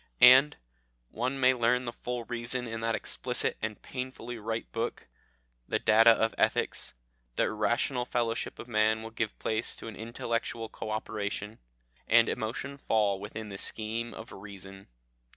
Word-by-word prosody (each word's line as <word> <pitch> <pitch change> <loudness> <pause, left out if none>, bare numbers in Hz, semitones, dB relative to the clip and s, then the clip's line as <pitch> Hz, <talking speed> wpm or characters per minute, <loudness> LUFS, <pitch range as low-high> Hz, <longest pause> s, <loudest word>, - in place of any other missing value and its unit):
"And 130 +4 +8 0.5
one 130 +4 -2
may 130 0 +6
learn 125 +1 +2
the 120 - -4
full 125 0 -4
reason 120 +1 -1
in 115 0 -4
that 115 0 +1
explicit - - -1
and 110 -2 -3
painfully 125 -2 -5
right 110 +1 -3
book, 115 +1 -3 0.6
the - - +1
Data 110 +2 +6
of 110 -1 +4
Ethics - - +1 0.4
the - - +2
irrational 120 +3 0
fellowship 120 -2 -1
of - - -8
man 110 -1 +2
will 115 - -7
give 110 -1 -2
place 110 +1 -1
to - - -9
an 115 - -7
intellectual 115 0 -3
co 110 - -6
operation, 105 0 -3 0.5
and 115 0 +6
emotion 130 +5 -3
fall 105 -6 +2
within 105 +2 -6
the 100 -1 -6
scheme 115 +2 -1
of 115 +3 -9
reason. 95 -1 -9
115 Hz, 150 wpm, -30 LUFS, 110-120 Hz, 0.6 s, And